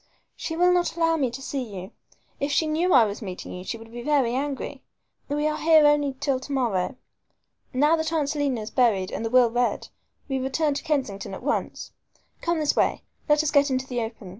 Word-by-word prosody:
"She 325 - -4
will 360 +2 +4
not 355 -1 +1
allow 330 -1 +3
me 275 -6 +1
to 260 +3 -8
see 275 0 -3
you. 195 -6 -7 0.5
If 280 +1 -1
she 315 - +2
knew 320 +4 +1
I 255 -7 +7
was 205 +2 -5
meeting 185 -4 -7
you 180 - -7
she 230 - -4
would 225 0 -13
be 240 +1 -7
very 265 -3 +2
angry. 275 +1 -3 0.5
We 295 +1 0
are 305 0 0
here 315 -1 +6
only 290 -2 +3
till 275 -3 0
to 260 - -9
morrow. 240 -5 0 0.8
Now 295 +5 +3
that 320 0 -2
Aunt 310 -4 +1
Selina 285 -5 -1
is 215 - -7
buried 215 -7 +2
and - - -4
the 225 - -1
will 245 -1 +5
read, 245 +1 0 0.4
we 270 -2 -1
return 285 +3 0
to 280 - -4
Kensington 255 -11 -2
at - - -10
once. 295 +2 -2 0.5
Come 340 0 0
this 305 -2 +1
way. - - +1 0.3
Let 295 +1 +4
us 310 - 0
get 285 -1 +4
into 260 0 -1
the 245 -2 -3
open. 225 -4 -6
275 Hz, 215 wpm, -25 LUFS, 235-300 Hz, 0.8 s, I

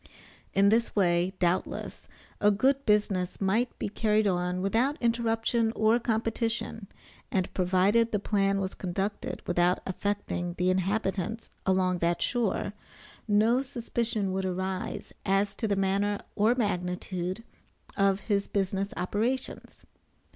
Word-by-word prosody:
In 200 +1 +5
this 230 +2 +2
way, 175 -2 +2
doubtless, 180 0 -1 0.3
a 205 - +5
good 265 +7 +2
business 200 -4 +1
might 215 +6 +1
be - - -2
carried 215 +1 +1
on 180 -1 0
without 240 +9 +1
interruption 230 -1 +1
or 220 +2 +3
competition, 225 -1 -2 0.4
and 185 -2 -1
provided 195 +5 +3
the 210 - +2
plan 200 -1 +1
was 190 -1 -2
conducted 195 +3 -3
without 175 +1 +2
affecting 190 -2 -2
the 180 +1 +2
inhabitants 195 +3 -1 0.2
along 185 -1 +2
that 170 0 +1
shore, 225 -4 0 0.5
no 220 +4 +4
suspicion 235 -5 -2
would 190 +1 -1
arise 185 0 -3
as 195 +1 +1
to 220 +2 -2
the 200 - +1
manner 195 +1 +1 0.2
or 220 +4 +3
magnitude 180 -2 -2 0.5
of 195 0 +2
his 200 -1 0
business 195 0 -1
operations. 235 +8 -3
200 Hz, 125 wpm, -28 LUFS, 185-225 Hz, 0.5 s, In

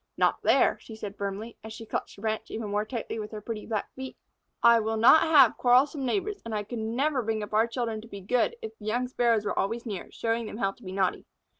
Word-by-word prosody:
"Not - - +2
there," - - +3
she 220 - -11
said 205 -2 -7
firmly, 200 +3 -5
as 220 0 -8
she 225 0 -9
clutched - - -4
the 200 - -14
branch 220 0 -2
even 220 -2 -4
more 210 +1 0
tightly 225 -1 -4
with 210 -1 -5
her 215 - -6
pretty 210 0 -6
black 215 -3 -3
feet. 265 0 -8 0.5
"I 235 0 +7
will 220 0 -1
not 240 +8 +7
have 320 -3 +6
quarrelsome 265 +3 +3
neighbors, 400 +7 -1
and 230 -1 -4
I 210 - -1
could 230 +3 -6
never 255 +6 0
bring 220 -1 -2
our 215 +2 +2
children 230 -2 -3
up - - -9
to 225 - -13
be 200 -3 -8
good 250 - +1
if 445 0 -6
the - - -11
young 240 +4 0
Sparrows 235 -4 +1
were - - -1
always 230 +5 -1
near, 205 -6 -5
showing 230 0 -1
them 210 - -7
how 195 -4 0
to 220 - -22
be 185 -4 -7
naughty." 190 -1 -1
225 Hz, 250 wpm, -28 LUFS, 210-245 Hz, 0.5 s, I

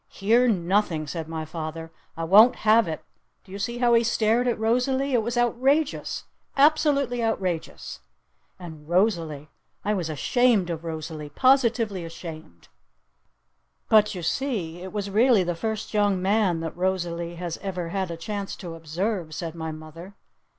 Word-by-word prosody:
"Hear 230 +5 +2
nothing!" 180 -5 +1
said 160 +1 -5
my 160 -1 -4
father. 160 0 -6 0.3
"I 165 - -3
won't 210 +8 +7
have 220 -1 +5
it! 160 -1 -5 0.4
Did 190 - -17
you 200 - -6
see 235 +4 -3
how 240 -1 +3
he 230 0 +5
stared 230 +1 +2
at 240 - +1
Rosalee? 250 +5 +1
It 240 - +3
was 235 +2 -3
outrageous! 265 +5 +1 0.3
Absolutely 280 -4 +3
outrageous! 185 -7 -3 0.6
And 160 -4 -11
Rosalee? 170 -6 0 0.4
I 210 - +1
was 175 -5 -2
ashamed 210 - +2
of 165 -1 -5
Rosalee! 155 -2 -6
Positively 235 - +2
ashamed!" 160 - -10 1.2
"But 210 -1 +5
you 180 - -6
see 175 - -2
it 185 0 -7
was 200 -1 -4
really 225 -1 +4
the 175 0 -1
first 220 +6 -4
young 205 -3 +2
man 190 -3 +1
that 165 -1 -5
Rosalee 175 -2 -2
has 170 -1 -5
ever 180 -4 -4
had 190 0 -2
a 170 - -5
chance 200 +3 -5
to 175 -4 -8
observe," 165 +1 -3
said 165 -3 -5
my 160 -1 -5
mother. 155 +5 -10
190 Hz, 155 wpm, -25 LUFS, 165-230 Hz, 1.2 s, won't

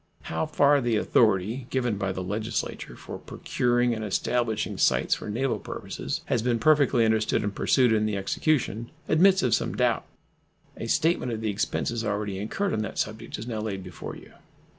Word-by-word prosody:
How 160 - 0
far 145 -2 +4
the 120 -2 +1
authority 110 +3 +2
given 120 -6 -1
by 100 -1 -1
the 95 0 -4
Legislature 105 +4 -3
for - - -8
procuring 120 0 0
and 110 -1 -4
establishing 110 +2 -1
sites - - +3
for - - -4
naval 125 +5 -1
purposes - - -5
has - - 0
been 120 0 +1
perfectly 140 -4 +4
understood 110 0 +1
and 105 -1 -2
pursued 125 +2 +3
in 110 0 +2
the 105 -2 -1
execution 115 +1 0 0.2
admits 190 +4 +5
of 125 - +2
some - - 0
doubt. - - +1 0.7
A 115 - -6
statement 155 -1 +1
of 110 -1 -3
the 110 -1 0
expenses 110 +3 -1
already 105 -2 -2
incurred 190 - -2
on 110 - 0
that 110 - -5
subject 110 +2 -3
is 105 - -6
now 115 -3 -3
laid 100 -3 -4
before 90 -2 -8
you. - - -14
115 Hz, 180 wpm, -26 LUFS, 105-125 Hz, 0.7 s, admits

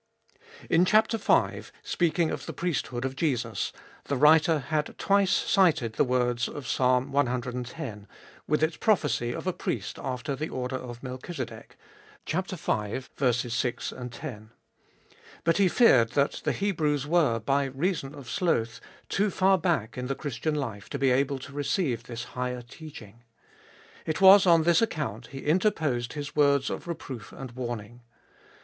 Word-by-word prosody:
IN 165 +2 +4
chap, 215 +4 +4
v., 225 -3 +2 0.2
speaking 170 - +1
of - - -5
the - - -5
priesthood 135 -7 -2
of 130 0 -3
Jesus, 125 -7 -1 0.3
the 140 - -1
writer 155 +3 +5
had 150 +2 -2
twice 200 -1 +3
cited 160 - +3
the - - +2
words 125 -2 +1
of 140 -4 -7
Psalm 125 +1 +1
ex., 125 -1 -2 0.5
with 150 +1 +1
its 160 +1 +1
prophecy 145 - +1
of - - -6
a 185 - 0
Priest - - -4
after 130 +1 -3
the 155 +4 -4
order 130 0 -3
of 120 -1 -7
Melchizedek 130 +6 -7 0.5
(v. 155 - -2 0.3
6, 120 0 -2 0.2
10). 115 -4 -8 0.9
But 165 - +2
he 200 -2 +4
feared 130 - +5
that 140 0 +1
the - - +2
Hebrews 150 -8 0
were, 150 -7 +3
by 135 +5 +1
reason 140 +1 -2
of 140 -4 -11
sloth, 115 - 0 0.3
too 205 +2 +1
far 190 0 +3
back 155 - -1
in 125 - -3
the 135 - -2
Christian 150 +3 -3
life 115 -9 -4
to - - -3
be 135 -1 +2
able 135 +2 +1
to 135 +1 -10
receive 140 - -1
this 120 0 -6
higher 125 0 -4
teaching. 120 -5 -12 0.9
It 155 - -1
was 195 0 +8
on 165 -2 +6
this 170 +3 +4
account 130 - -2
he 135 +2 -9
interposed 150 - +1
his 145 -1 -6
words 140 -2 +3
of - - -6
reproof 135 -9 -6
and 135 -2 -8
warning. 120 -2 -6
140 Hz, 150 wpm, -27 LUFS, 120-165 Hz, 0.9 s, was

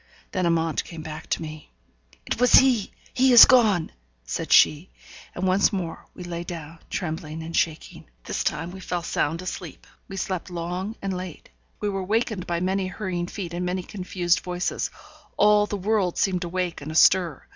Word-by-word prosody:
Then 185 -2 0
Amante 165 -2 +1
came 165 -2 -9
back 155 0 -8
to - - -1
me. 155 -1 -9 0.6
'It - - -3
was 250 - +4
he! 250 -6 +5 0.2
he 260 0 +4
is 240 - +11
gone!' 215 -10 +4 0.3
said - - -4
she, 155 +5 +5 0.5
and 185 - -2
once 190 +3 +3
more 180 -5 -5
we 180 - -8
lay 170 -1 -5
down, 165 -2 -8
trembling 160 -3 -4
and 165 +1 -6
shaking. 160 -2 -2 0.2
This - - -3
time 165 +3 -2
we 190 - -9
fell 175 -2 -3
sound 160 +2 -1
asleep. 180 -3 -7 0.2
We 195 - -8
slept 185 -2 -3
long 180 +4 -4
and 195 -1 -2
late. 180 -3 -8 0.3
We 210 - 0
were 195 -1 -3
wakened 215 -1 -1
by 170 0 -1
many 190 +1 0
hurrying 180 -2 -3
feet, 180 -3 -6
and 175 +1 -3
many 180 +1 -2
confused 180 -2 -1
voices; 180 0 -2 0.5
all 210 0 +5
the 205 - -3
world 195 -2 0
seemed 185 -2 +1
awake 175 -1 -3
and 150 +2 -6
astir. 165 -1 +4
180 Hz, 180 wpm, -24 LUFS, 165-195 Hz, 0.6 s, is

